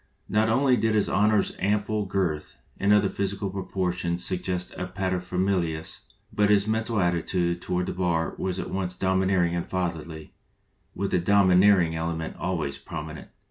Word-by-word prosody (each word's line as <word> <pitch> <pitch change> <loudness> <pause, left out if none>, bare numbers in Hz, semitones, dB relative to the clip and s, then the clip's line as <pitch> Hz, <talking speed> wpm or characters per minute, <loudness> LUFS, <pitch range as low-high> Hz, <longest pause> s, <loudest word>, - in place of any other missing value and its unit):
Not 110 +1 +2
only 130 +2 +3
did 110 -1 +1
his 105 - +2
Honor's 105 0 +2
ample 105 +1 0
girth 90 -6 -2 0.2
and 100 +1 +2
other 105 -1 +5
physical 100 0 -2
proportions 90 -2 -2
suggest 90 -1 -2
a 95 - -4
paterfamilias, 90 -3 -2 0.3
but 105 0 +2
his 100 -1 +4
mental 110 0 0
attitude 85 0 0
toward 90 0 -1
the - - -3
bar 85 -3 0
was 95 -1 -2
at - - -5
once 90 -1 -2
dom 95 0 +1
ineering 95 -3 +2
and 85 - -3
fatherly, 85 -4 -4 0.6
with 100 0 -2
the 90 - +3
domineering 95 -2 +4
ele 80 +1 -2
ment 80 0 -5
always 80 -7 -2
prominent. 80 -1 -7
95 Hz, 155 wpm, -26 LUFS, 85-100 Hz, 0.6 s, other